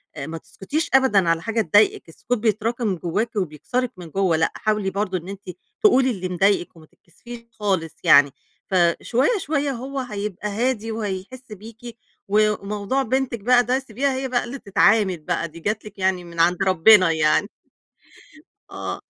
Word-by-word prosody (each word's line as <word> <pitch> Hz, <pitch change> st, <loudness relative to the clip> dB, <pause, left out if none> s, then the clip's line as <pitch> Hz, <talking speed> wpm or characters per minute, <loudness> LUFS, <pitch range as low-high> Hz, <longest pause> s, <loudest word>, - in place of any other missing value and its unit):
آآ، 140 Hz, -, -6 dB
ما 165 Hz, 0 st, -6 dB
تسكتيش 295 Hz, -, -4 dB
أبدًا 210 Hz, -10 st, +4 dB
على 165 Hz, -1 st, +1 dB
حاجة 225 Hz, +4 st, -1 dB
تضايقِك، 205 Hz, -2 st, +2 dB
السكوت 245 Hz, +9 st, -3 dB
بيتراكم 220 Hz, -1 st, -1 dB
جواكِ 210 Hz, +8 st, -3 dB
وبيكسرِك 205 Hz, -, -2 dB
من 175 Hz, -3 st, -10 dB
جوّه، 185 Hz, -2 st, +1 dB
لأ، 160 Hz, -, +1 dB
حاولي 210 Hz, -2 st, -1 dB
برضه 190 Hz, -1 st, -2 dB
إن 175 Hz, +3 st, -9 dB
أنتِ 195 Hz, -2 st, -9 dB, 0.3 s
تقولي 265 Hz, -11 st, +5 dB
اللي 185 Hz, -4 st, -4 dB
مضايقِك 185 Hz, 0 st, +1 dB
وما 160 Hz, -1 st, -16 dB
تتكسفيش 230 Hz, +9 st, -14 dB
خالص 190 Hz, -7 st, -2 dB
يعني. 140 Hz, -1 st, +6 dB, 0.4 s
ف 190 Hz, -, -1 dB, 0.3 s
شوية، 270 Hz, -, +1 dB
شوية 290 Hz, -4 st, -1 dB
هو 265 Hz, +2 st, -5 dB
هيبقى 210 Hz, -5 st, -5 dB
هادي 225 Hz, +1 st, -1 dB
وهيحِس 220 Hz, +3 st, -6 dB
بيكِ 225 Hz, +3 st, -11 dB, 0.3 s
و 210 Hz, +1 st, +3 dB
وموضوع 210 Hz, +6 st, -2 dB
بنتِك 260 Hz, -1 st, -1 dB
بقى 245 Hz, +4 st, +4 dB
ده 255 Hz, +2 st, 0 dB
سيبيها 265 Hz, +2 st, -2 dB
هي 265 Hz, 0 st, -3 dB
بقى 250 Hz, -1 st, 0 dB
اللي 260 Hz, +3 st, -7 dB
تتعامل 200 Hz, -2 st, +2 dB
بقى، 170 Hz, +1 st, -3 dB
دي 165 Hz, +1 st, -13 dB
جات 215 Hz, +4 st, -3 dB
لِك 210 Hz, -2 st, -12 dB
يعني 185 Hz, -1 st, 0 dB
من 170 Hz, -1 st, -10 dB
عند 175 Hz, +3 st, +3 dB
ربنا 185 Hz, 0 st, +5 dB
يعني. 160 Hz, +5 st, +2 dB, 1.2 s
آه. -, -, -5 dB
210 Hz, 165 wpm, -22 LUFS, 185-240 Hz, 1.2 s, يعني